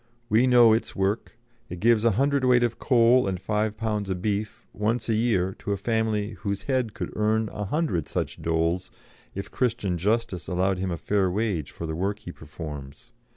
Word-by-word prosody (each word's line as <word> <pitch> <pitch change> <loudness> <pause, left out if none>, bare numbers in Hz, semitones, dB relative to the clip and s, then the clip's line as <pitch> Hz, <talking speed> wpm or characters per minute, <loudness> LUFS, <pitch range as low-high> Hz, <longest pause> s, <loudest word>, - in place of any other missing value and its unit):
We 115 +4 +4
know 120 -3 +7
its 110 - -1
work. 100 +4 -1 0.3
It 90 - -6
gives 115 +1 +4
a 115 - +4
hundred 140 0 +2
weight 125 -1 +4
of 120 -1 -1
coal 125 -2 +4
and 95 -2 -2
five 105 +2 -1
pounds 105 -3 -2
of 95 -1 -2
beef 105 +1 -3
once 110 +3 -1
a 115 - +1
year 105 -5 +1
to 100 - -2
a - - -2
family 110 0 0
whose 100 -2 -3
head 130 -4 -1
could - - -5
earn 110 +1 +1
a 105 - -5
hundred 100 - -1
such - - -3
doles 85 +2 0 0.5
if 100 - -6
Christian 105 -8 -1
justice 100 -4 -1
allowed 95 +1 0
him 90 -2 -2
fair 100 +2 +1
wage 95 -6 -1
for 85 - -7
the 80 - -3
work 100 +4 -1
he 90 - -9
performs. 75 - -9
105 Hz, 190 wpm, -26 LUFS, 90-115 Hz, 0.5 s, know